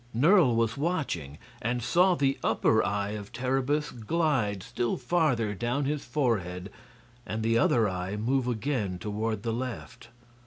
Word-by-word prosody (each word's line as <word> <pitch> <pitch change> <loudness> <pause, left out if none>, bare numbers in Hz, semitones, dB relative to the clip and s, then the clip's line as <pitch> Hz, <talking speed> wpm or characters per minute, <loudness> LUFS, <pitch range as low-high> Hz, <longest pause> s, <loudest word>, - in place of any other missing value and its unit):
Nerle 150 - +5
was 115 -1 +1
watching, 140 - -2 0.2
and 120 +1 -1
saw 180 +8 +4
the 135 -3 +1
upper 110 0 +3
eye 100 0 -1
of 105 -1 -7
Terribus 135 +4 0
glide 120 - 0
still 120 -1 -2
farther 125 -7 +1
down 120 +7 -1
his 145 +1 -1
forehead 100 - -1 0.5
and 110 -1 -4
the 115 +1 +3
other 115 -2 +3
eye 90 +1 -3
move 125 +4 0
again 115 -5 -1
toward 110 +2 -3
the 115 -1 -1
left. 120 -1 -6
120 Hz, 145 wpm, -28 LUFS, 105-135 Hz, 0.5 s, Nerle